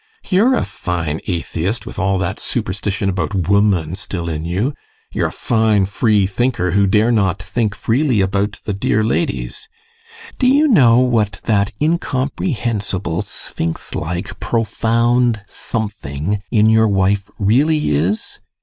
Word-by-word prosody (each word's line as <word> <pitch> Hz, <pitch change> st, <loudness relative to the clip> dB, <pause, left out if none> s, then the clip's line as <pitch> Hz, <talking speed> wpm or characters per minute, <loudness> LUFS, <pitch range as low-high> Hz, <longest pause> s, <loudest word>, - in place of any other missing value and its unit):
You're 220 Hz, +8 st, +4 dB
a -, -, 0 dB
fine 85 Hz, -5 st, -3 dB
atheist, 90 Hz, +4 st, -2 dB
with -, -, -7 dB
all 95 Hz, 0 st, +1 dB
that 95 Hz, 0 st, -2 dB
superstition 100 Hz, +1 st, -2 dB
about 95 Hz, +2 st, -1 dB
woman 100 Hz, -5 st, +2 dB
still 90 Hz, -3 st, -4 dB
in 80 Hz, 0 st, -3 dB
you! 100 Hz, -, -1 dB, 0.4 s
You're -, -, 0 dB
a -, -, -6 dB
fine 110 Hz, -4 st, +2 dB
free 105 Hz, +1 st, +2 dB
thinker, 95 Hz, -2 st, 0 dB
who 100 Hz, +2 st, +3 dB
dare 110 Hz, +4 st, +3 dB
not 100 Hz, -4 st, +1 dB
think 105 Hz, +2 st, -2 dB
freely 125 Hz, +1 st, +1 dB
about 100 Hz, +2 st, 0 dB
the 105 Hz, -, -2 dB
dear 105 Hz, +2 st, +1 dB
ladies! 420 Hz, -, -2 dB, 0.7 s
Do 255 Hz, -, +3 dB
you 285 Hz, +4 st, +5 dB
know 130 Hz, -, +5 dB
what 115 Hz, -6 st, +1 dB
that 100 Hz, -2 st, +1 dB
incomprehensible, 125 Hz, -, -1 dB
sphinx 85 Hz, -5 st, -5 dB
like, 90 Hz, +4 st, -4 dB
profound 115 Hz, 0 st, +1 dB
something 100 Hz, -, -4 dB
in 110 Hz, -2 st, +3 dB
your 110 Hz, 0 st, +5 dB
wife 100 Hz, 0 st, +1 dB
really 145 Hz, +10 st, +2 dB
is? 85 Hz, +9 st, -1 dB
105 Hz, 135 wpm, -18 LUFS, 95-120 Hz, 0.7 s, you